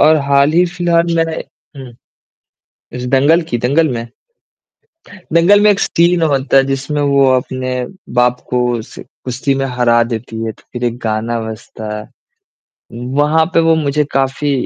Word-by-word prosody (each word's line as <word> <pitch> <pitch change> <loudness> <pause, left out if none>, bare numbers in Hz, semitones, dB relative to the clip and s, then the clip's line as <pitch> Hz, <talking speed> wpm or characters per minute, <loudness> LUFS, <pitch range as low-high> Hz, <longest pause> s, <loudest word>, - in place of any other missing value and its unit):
और 155 +1 +6
हाल 140 +1 +3
ही 175 +2 +4
फिलहाल 170 -1 0
मैंने 165 -1 0 0.4
हुँ। 130 -2 -10 1.0
इस 125 0 -5
दंगल 145 +6 +4
की 120 - -1
दंगल 140 +7 +2
में 120 -2 -4 1.3
दंगल 175 +5 +5
में 210 - +5
एक 200 - -1
सीन 170 0 +2
होता 135 -3 +2
है, 135 - +5
जिसमें 135 +2 -2
वो 140 -1 +3
अपने 130 0 -3 0.4
बाप 125 0 +2
को 125 0 +1
उस 110 - -10 0.3
कुश्ती 130 +2 -1
में 135 0 -1
हरा 120 -2 +2
देती 115 -1 -5
है, 110 - -2
तो - - -21
फिर 120 0 -5
एक 120 -1 -1
गाना 115 +1 -1
बजता 110 -1 -8
है, 105 - -9 1.1
वहाँ 150 +2 +3
पे 165 - +4
वो 165 0 +3
मुझे 150 -1 0
काफ़ी 135 +2 0
135 Hz, 160 wpm, -15 LUFS, 125-160 Hz, 1.3 s, और